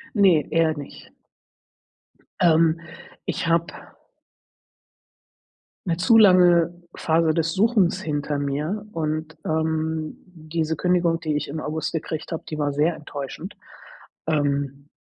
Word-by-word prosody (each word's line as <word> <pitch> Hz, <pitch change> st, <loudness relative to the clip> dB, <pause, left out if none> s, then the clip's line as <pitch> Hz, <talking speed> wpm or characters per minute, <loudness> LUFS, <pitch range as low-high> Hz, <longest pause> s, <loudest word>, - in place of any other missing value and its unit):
Ne, 185 Hz, -8 st, +4 dB
eher 165 Hz, -1 st, +3 dB
nicht. 145 Hz, -1 st, -10 dB, 1.3 s
Ähm, 165 Hz, -1 st, +4 dB, 0.5 s
ich -, -, -2 dB
habe 165 Hz, 0 st, +2 dB, 2.2 s
'ne 165 Hz, -, 0 dB
zu 225 Hz, +6 st, +4 dB
lange 180 Hz, -5 st, +6 dB, 0.2 s
Phase 160 Hz, 0 st, +2 dB
des 165 Hz, 0 st, 0 dB
Suchens 195 Hz, -2 st, +2 dB
hinter 145 Hz, -1 st, -2 dB
mir 150 Hz, +9 st, -2 dB
und, 155 Hz, 0 st, -3 dB
ähm, 160 Hz, 0 st, -1 dB
diese 160 Hz, -2 st, -3 dB
Kündigung, 175 Hz, -1 st, +1 dB
die 155 Hz, -3 st, -1 dB
ich 150 Hz, -, -3 dB
im 155 Hz, +2 st, -4 dB
August 155 Hz, +1 st, -3 dB
gekriegt 160 Hz, 0 st, -4 dB
habe, 165 Hz, -, -3 dB
die 155 Hz, -, -5 dB
war 145 Hz, -1 st, 0 dB
sehr 150 Hz, +4 st, +1 dB
enttäuschend. 150 Hz, +6 st, -7 dB, 0.7 s
Ähm 145 Hz, -2 st, -1 dB
160 Hz, 115 wpm, -23 LUFS, 150-170 Hz, 2.2 s, lange